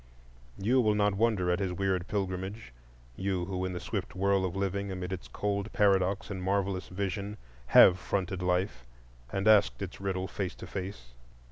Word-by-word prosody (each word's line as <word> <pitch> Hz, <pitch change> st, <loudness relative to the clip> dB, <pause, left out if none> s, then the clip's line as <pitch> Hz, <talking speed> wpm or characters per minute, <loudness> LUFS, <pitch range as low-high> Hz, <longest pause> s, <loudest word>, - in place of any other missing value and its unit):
You 120 Hz, +6 st, +3 dB
will 105 Hz, -2 st, +2 dB
not 105 Hz, -1 st, +2 dB
wonder 100 Hz, -4 st, +2 dB
at 90 Hz, -, +1 dB
his 95 Hz, -2 st, -1 dB
weird 95 Hz, -1 st, -1 dB
pilgrimage,—you 90 Hz, -, -4 dB
who 95 Hz, 0 st, -3 dB
in 95 Hz, -, -3 dB
the 90 Hz, -, -4 dB
swift 95 Hz, -1 st, -4 dB
whirl 95 Hz, 0 st, +2 dB
of 90 Hz, -, -3 dB
living, 100 Hz, 0 st, -1 dB
amid 90 Hz, 0 st, -4 dB
its 95 Hz, -, -6 dB
cold 100 Hz, +1 st, -2 dB
paradox 100 Hz, 0 st, +2 dB
and 95 Hz, -1 st, -4 dB
marvellous 95 Hz, 0 st, 0 dB
vision, 100 Hz, +2 st, -3 dB, 0.3 s
have 90 Hz, +8 st, +8 dB
fronted 95 Hz, -1 st, -2 dB
life 90 Hz, -9 st, -1 dB, 0.4 s
and 95 Hz, +2 st, -1 dB
asked 110 Hz, -2 st, +5 dB
its 95 Hz, -1 st, -6 dB
riddle 95 Hz, -1 st, -2 dB
face 95 Hz, -2 st, -4 dB
to -, -, -9 dB
face. 90 Hz, -11 st, -6 dB
95 Hz, 165 wpm, -30 LUFS, 90-100 Hz, 0.4 s, have